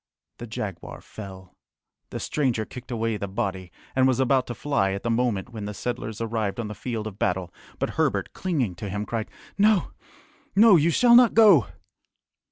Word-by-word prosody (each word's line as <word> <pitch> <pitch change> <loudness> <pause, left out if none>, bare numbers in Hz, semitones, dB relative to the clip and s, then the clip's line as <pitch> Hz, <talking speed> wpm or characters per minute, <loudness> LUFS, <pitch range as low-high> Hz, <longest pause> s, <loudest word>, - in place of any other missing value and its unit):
The 120 - -7
jaguar 100 -5 -6
fell. 95 -3 -11 0.5
The - - -5
stranger 125 -7 -1
kicked 125 +4 -11
away 115 -2 -1
the 100 - -4
body, 95 -1 -4 0.2
and 130 0 +4
was 130 -1 +1
about 130 0 +2
to 120 - -5
fly 135 -10 0
at 100 - -5
the 115 - 0
moment 115 -3 0
when 110 -3 -7
the 105 0 -6
settlers 110 -2 -4
arrived 110 -2 -2
on 115 - -3
the - - -5
field 110 0 -5
of 105 -1 -8
battle, 90 -1 -1 0.2
but - - -2
Herbert, - - 0
clinging 145 - -1
to 100 +1 -5
him, 105 +2 -3
cried, 110 +1 -4 0.3
"No, 210 -2 +3 0.6
no! 215 0 +7
You 165 0 +4
shall 235 +8 +4
not 245 -2 +6
go!" 205 - +6
115 Hz, 180 wpm, -25 LUFS, 100-135 Hz, 0.6 s, no